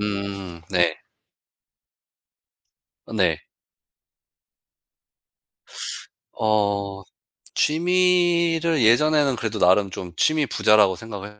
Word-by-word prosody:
음 100 -4 -5
네. 85 -4 +1 2.2
네. - - 0 2.9
어 100 -2 -1 0.5
취미를 170 -2 +1
예전에는 140 +3 +3
그래도 115 -2 -4
나름 95 +2 +3
좀 90 -1 -8
취미 155 -1 +2
부자라고 105 -5 +3
생각을 105 0 -10
105 Hz, 135 characters per minute, -22 LUFS, 100-155 Hz, 2.9 s, 예전에는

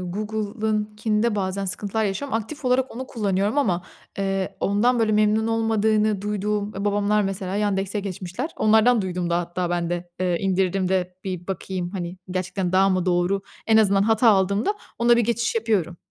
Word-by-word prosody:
Google'ınkinde 215 +2 -1
bazen 195 0 -2
sıkıntılar 205 +3 -1
yaşıyorum. 225 +7 -3
Aktif 275 +7 -6
olarak 255 +1 +2
onu 260 +1 -5
kullanıyorum 205 +1 0
ama, 180 -11 +1 0.4
eee, 195 -1 -1
ondan, 235 +5 +2
böyle, 220 -1 +2
memnun 215 +1 +3
olmadığını 220 -2 +1
duyduğum, 210 0 -2
eee, 200 +1 -4
babamlar 205 +1 +2
mesela 195 0 -3
Yandex'e 200 0 0
geçmişler. 195 - -5
Onlardan 220 +1 +4
duydum 180 -2 -3
da 170 - +2
hatta 175 0 -3
ben 175 -1 -1
de, 175 0 -3
eee, 180 -2 +1
indirdim 190 -1 +1
de 180 -1 0
bir 180 -2 -5
bakayım, 185 -1 -4
hani, 180 -2 -5
gerçekten 185 0 -2
daha 190 +1 +4
mı 185 -1 0
doğru? 180 +2 +1 0.2
En 220 - +4
azından 200 -3 +4
hata 225 +2 +4
aldığımda 200 - +2 0.2
ona 235 0 +5
bir 235 - +3
geçiş 235 0 0
yapıyorum. 210 -7 0
200 Hz, 165 wpm, -23 LUFS, 185-220 Hz, 0.4 s, ona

